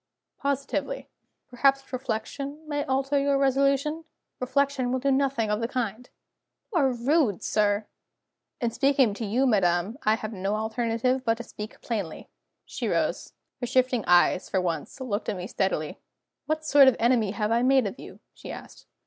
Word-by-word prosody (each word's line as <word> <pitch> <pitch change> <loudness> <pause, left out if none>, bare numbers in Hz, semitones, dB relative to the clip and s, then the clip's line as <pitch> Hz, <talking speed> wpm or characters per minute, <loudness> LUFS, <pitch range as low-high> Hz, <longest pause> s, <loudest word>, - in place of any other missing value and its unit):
"Positively." 280 - -2 0.4
"Perhaps 270 +2 +1
reflection 275 +5 -4
may 290 -1 -1
alter 270 +2 +1
your 280 0 +2
resolution?" 275 +3 +1 0.4
"Reflection 260 0 0
will 260 - +1
do 275 +2 +1
nothing 265 -5 +1
of 210 - 0
the 230 - 0
kind." 245 -1 -3 0.6
"You 345 - +3
are 270 -3 +3
rude, 250 - +1
sir!" 205 0 +1 0.7
"In 235 -4 0
speaking 270 -4 +3
to 220 - -6
you, 245 +7 +2
madam, 195 0 +1
I 215 +1 +3
have 220 0 -6
no 195 +1 -2
alternative 230 +3 0
but 225 -2 +2
to 235 - -6
speak 215 -1 -9
plainly." 205 -9 -4 0.4
She - - -4
rose. - - -1 0.3
Her 245 - -3
shifting 250 -2 +2
eyes, 175 +1 +4
for 190 - +1
once, 170 - -3
looked 230 -5 -3
at 200 - -2
me 180 - -5
steadily. 190 -7 -2 0.5
"What 310 0 -1
sort 285 -3 +7
of 260 - +5
enemy 235 -3 +2
have 210 +2 -2
I 235 +1 +3
made 260 -1 +4
of 200 +5 -5
you?" - - -11
she - - -9
asked. - - -11
245 Hz, 165 wpm, -26 LUFS, 215-275 Hz, 0.7 s, sort